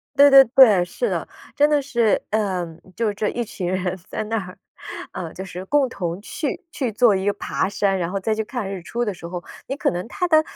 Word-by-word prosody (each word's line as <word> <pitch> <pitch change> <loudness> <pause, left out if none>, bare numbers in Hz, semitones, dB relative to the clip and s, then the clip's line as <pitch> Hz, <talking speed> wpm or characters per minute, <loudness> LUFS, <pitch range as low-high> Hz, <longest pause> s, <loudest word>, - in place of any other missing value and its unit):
对 285 +1 +8
对 270 0 +11
对， 225 -7 +6
是 485 - -2
的。 - - -2 0.3
真 295 +1 +5
的 295 -1 +3
是， 235 -5 +1
嗯， 185 -6 -2 0.2
就 225 -3 0
这 210 +1 -1
一 240 - -2
群 190 -5 -5
人 185 0 -1
在 215 - -3
那 225 +1 -1
儿， 185 - -12 0.5
呃， 165 -3 -6
就 190 - -6
是 185 0 -7
共 275 +4 +2
同 175 -3 -4
去 285 +6 -4
去 275 -7 -2
做 225 0 +4
一 190 0 -1
个 205 - +2
爬 200 - -2
山， 195 -1 0
然 170 - -1
后 195 - -2
再 215 +3 0
去 220 - -1
看 230 -5 -4
日 185 - -6
出 235 +7 -3
的 210 -4 -2
时 170 -1 -9
候， 175 0 -6 0.2
你 270 - -3
可 - - 0
能 180 +3 -4
它 360 +8 -2
的 315 -1 +6
210 Hz, 250 characters per minute, -22 LUFS, 185-245 Hz, 0.5 s, 对